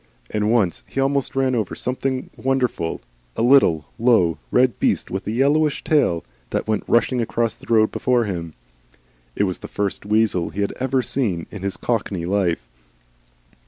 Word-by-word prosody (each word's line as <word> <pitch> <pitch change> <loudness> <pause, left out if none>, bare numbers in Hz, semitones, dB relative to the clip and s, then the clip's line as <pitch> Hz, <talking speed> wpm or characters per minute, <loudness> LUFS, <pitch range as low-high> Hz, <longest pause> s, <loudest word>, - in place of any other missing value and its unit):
And 105 0 0
once 105 -8 +2
he - - -4
almost 135 0 0
ran 135 -1 +2
over 110 -6 -1
something 130 +1 -2
wonderful, 125 - -1 0.3
a - - 0
little, 120 - +5
low, 110 -9 +3
red 125 -3 +2
beast - - 0
with 95 +1 -4
a - - 0
yellowish 145 +5 +2
tail, 115 - +2 0.2
that - - -2
went 110 -2 0
rushing 120 +1 +2
across 115 0 0
the - - -11
road 110 -1 +4
before 125 -2 +1
him. 85 -5 -5 0.8
It - - +1
was 95 -3 -1
the - - -8
first 100 -1 -3
weasel 105 -4 +1
he 100 - -4
had 100 - -1
ever 130 0 +1
seen 100 -13 -1
in 105 - -8
his 100 -1 -2
cockney 100 -7 -2
life. 90 -8 0
110 Hz, 165 wpm, -22 LUFS, 95-130 Hz, 0.8 s, little